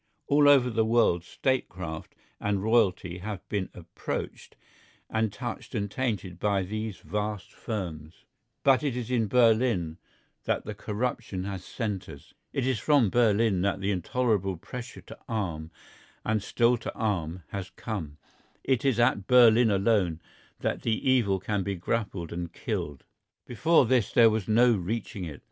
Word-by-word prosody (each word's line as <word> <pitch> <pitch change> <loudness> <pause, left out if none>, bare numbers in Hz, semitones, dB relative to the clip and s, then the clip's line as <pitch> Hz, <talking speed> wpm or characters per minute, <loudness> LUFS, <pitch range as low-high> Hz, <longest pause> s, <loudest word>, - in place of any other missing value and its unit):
All 145 0 +5
over 130 -3 +5
the 110 0 +2
world 110 -7 +3
statecraft 90 - -3 0.2
and 100 -2 -1
royalty 100 -5 +2
have 100 -1 -6
been 100 -3 -2
approached 85 -1 -6 0.6
and 110 -1 +1
touched 120 +4 -6
and 100 -2 -2
tainted 105 -9 -3
by 100 -1 +1
these 110 +1 -4
vast 105 -1 -4
firms, 85 -7 -6 0.4
but 135 -2 +5
it 140 -5 -1
is 125 0 -4
in 115 -3 +2
Berlin 110 -7 +3 0.5
that - - -1
the - - -4
corruption 110 -3 -3
has 95 -2 -5
centred, 95 - -5 0.3
it 135 - -1
is 130 -4 0
from 140 -8 +3
Berlin 110 -4 +3
that 100 0 0
the 100 +1 0
intolerable 100 0 0
pressure 125 +8 -8
to - - -12
arm 85 -9 -3 0.6
and 110 0 +1
still 120 +4 +2
to - - -5
arm 90 -6 -2
has 95 -1 -5
come, 90 -6 -6 0.5
it 130 -4 +1
is 135 -4 +2
at 120 -5 +2
Berlin 120 -2 +6
alone 100 -5 +2 0.4
that - - -1
the 115 +3 -1
evil 115 -7 +3
can 100 +1 -1
be 100 +1 -2
grappled 95 -2 -3
and 85 -1 -4
killed. 70 -3 -4 0.4
Before 150 +5 +3
this 120 -2 +2
there 115 -2 +6
was 110 -3 -2
no 120 +3 +5
reaching 100 -1 -3
it. 75 -4 -8
105 Hz, 150 wpm, -28 LUFS, 95-120 Hz, 0.6 s, Berlin